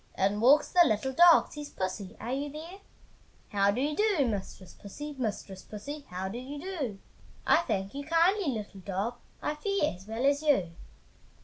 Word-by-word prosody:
In 200 +2 +1
walks 270 +5 +5
the 360 - +6
little 265 0 0
dog, 340 +3 +6
Says 295 -1 -7
"Pussy! 185 0 -5
are 235 +4 -4
you 285 +2 -2
there?" 330 +6 -9 0.7
"How 200 -1 +2
do 205 +5 0
you 295 +2 0
do, 410 -8 +2
Mistress 195 -3 -5
Pussy? 295 +9 -8
Mistress 205 -5 -4
Pussy, 280 +8 -8
how 185 +1 -4
do 220 +5 -5
you 280 +3 -7
do?" 300 - -4 0.5
"I - - +6
thank 200 - -2
you 285 +1 -5
kindly, 340 +4 +3
little 215 -6 -4
dog, 200 +6 -3 0.3
I 300 - 0
fare 390 +1 0
as 185 +3 -15
well 225 +4 -2
as 285 +1 +3
you!" 270 - +2
265 Hz, 180 wpm, -29 LUFS, 200-300 Hz, 0.7 s, the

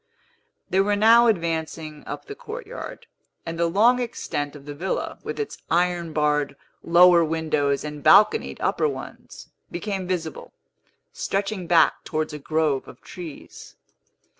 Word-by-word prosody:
They 190 - +1
were 205 +1 +3
now 230 +3 +6
advancing 160 -5 -2
up - - -6
the 420 - -7
courtyard; - - -8 0.4
and 165 0 -5
the 170 - +3
long 230 +8 +4
extent 145 -11 -4
of 140 -1 -12
the 145 - -6
villa, 175 +7 -3
with - - -5
its 435 - -4
iron 175 -1 +1
barred 150 -2 0 0.3
lower 175 0 +6
windows 155 -3 0
and 150 -1 -6
balconied 210 - +5
upper 460 - +1
ones, - - -9 0.2
became 190 +1 -4
visible, 170 -4 -4 0.6
stretching 195 -2 -2
back 170 -1 +4
towards 155 0 -3
a 150 - -6
grove 155 -2 0
of - - -13
trees. 170 -5 -10
170 Hz, 140 wpm, -24 LUFS, 155-200 Hz, 0.6 s, now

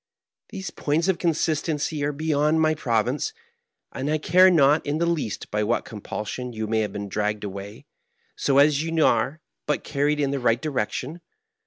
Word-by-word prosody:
These 195 -3 -6
points 155 +4 0
of 180 -2 +1
consistency 155 -2 0
are 145 - +1
beyond 150 +1 +1
my 155 0 +3
province, 125 - -1 0.6
and 135 +3 -3
I 155 - +2
care 180 +5 +5
not 150 -3 +4
in 145 +1 -1
the 170 - +1
least 165 -10 -2
by 105 0 0
what 115 +3 0
compulsion 110 +3 -6
you 110 -1 -3
may 110 +1 0
have 105 -1 -1
been 100 0 -5
dragged 105 +1 -2
away, 100 +1 -7 0.5
so 135 - +1
as 145 0 +5
you 165 0 +1
are 155 +3 +1 0.3
but - - 0
carried 150 +1 0
in 140 -2 +1
the 140 - -1
right 120 -1 +2
direction. 145 +3 -3
145 Hz, 175 wpm, -24 LUFS, 115-155 Hz, 0.6 s, care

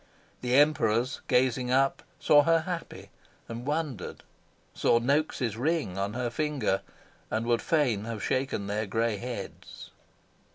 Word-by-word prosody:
The 125 0 +1
Emperors, 130 -3 +3
gazing 125 0 +2
up, 135 +2 +2 0.2
saw 145 -1 +6
her 165 +2 +3
happy, 170 0 -6 0.4
and 120 +3 -7
wondered; 145 - -3 0.5
saw 115 - +3
Noaks' 130 -3 0
ring 145 - -1
on 100 +1 -2
her 120 -1 -2
finger, 140 -8 0 0.5
and 110 +1 -1
would 120 -1 +2
fain 125 -10 +1
have 115 -2 -5
shaken 130 -6 -1
their 105 +2 -2
grey 115 +1 0
heads. 120 -3 -8
125 Hz, 130 wpm, -28 LUFS, 110-145 Hz, 0.5 s, saw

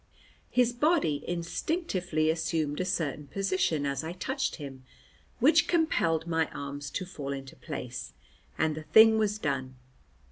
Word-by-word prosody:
His 245 -1 +3
body 245 - +2
instinctively 175 - -1
assumed 160 -2 -1
a 185 - 0
certain 155 -6 -2
position 185 -5 0
as 140 0 -1
I 160 +2 -4
touched 265 +9 -2
him, 135 -4 -9 0.5
which 300 +7 +5
compelled 170 - +2
my 160 -2 +1
arms 140 0 -6
to 185 - -3
fall 145 -6 -6
into 135 -1 -6
place, 125 0 -6 0.4
and 160 -1 +2
the 155 - -6
thing 220 +7 +7
was 210 -1 +1
done. 135 -7 -2
165 Hz, 140 wpm, -29 LUFS, 145-215 Hz, 0.5 s, thing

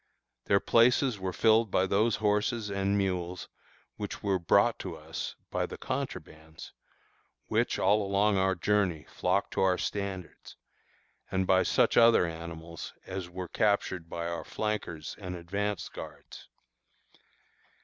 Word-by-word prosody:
Their 100 - +4
places 120 0 +3
were 95 0 -2
filled 110 +3 +4
by 95 - +2
those 105 +4 +2
horses 105 +1 0
and 100 +1 +1
mules 90 -2 -2 0.5
which - - -6
were 100 -2 +1
brought 100 +7 +3
to 90 -4 -5
us 80 +1 -6 0.2
by - - -1
the - - -8
contrabands, 80 0 -6 0.8
which - - +1
all 105 +3 +3
along 100 +1 +2
our 95 0 +2
journey 90 -4 +1
flocked - - -1
to - - 0
our 95 -1 +3
standards, 100 -3 -5 0.7
and 95 0 0
by 95 0 +4
such - - +2
other 115 -5 +6
animals 85 0 -7
as 95 -2 -5
were 90 0 -6
captured 100 -6 0
by 85 0 -4
our 85 0 -3
flankers 100 -8 -4
and 90 -3 -5
advance 100 +2 -3
guards. - - -10
95 Hz, 135 wpm, -29 LUFS, 85-105 Hz, 0.8 s, other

